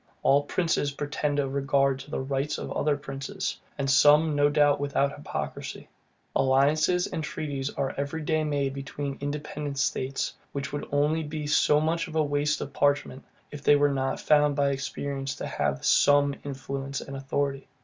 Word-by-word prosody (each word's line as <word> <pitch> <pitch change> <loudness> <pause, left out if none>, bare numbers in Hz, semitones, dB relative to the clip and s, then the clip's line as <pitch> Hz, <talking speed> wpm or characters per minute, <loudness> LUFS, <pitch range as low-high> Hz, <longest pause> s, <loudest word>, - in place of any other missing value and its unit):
All 140 +1 +5
princes 155 -1 0
pretend 145 0 -2
a 140 -1 +1
regard 140 0 +1
to 140 - -10
the - - -3
rights 135 +2 -2
of - - -6
other 145 -1 +1
princes; 135 -1 -4 0.2
and 140 - -1
some, 150 +3 +5
no 145 0 +4
doubt, 145 -1 +3
without 140 0 0
hypocrisy. 145 - -6 0.5
Alliances 150 +7 +3
and 160 - -4
treaties 140 -2 -3
are 135 -2 -2
every 140 +3 -3
day 155 +1 +1
made 140 -3 -1
between 140 0 -5
independent 145 0 -4
states, 135 0 -1 0.2
which 140 0 -4
would 145 - -4
only 150 +3 +2
be 150 0 -5
so 150 0 +4
much 165 +3 0
waste 150 -1 0
of 140 - -6
parchment, 145 -2 +1 0.3
if 145 - -8
they 145 - +5
were 145 0 +3
not 135 -1 -1
found 150 -1 +3
by 140 -1 +2
experience 140 0 -3
to - - -5
have 70 0 -2
SOME 145 0 +4
influence 140 0 -4
and 135 - -8
authority. 135 0 -2
145 Hz, 165 wpm, -27 LUFS, 140-150 Hz, 0.5 s, All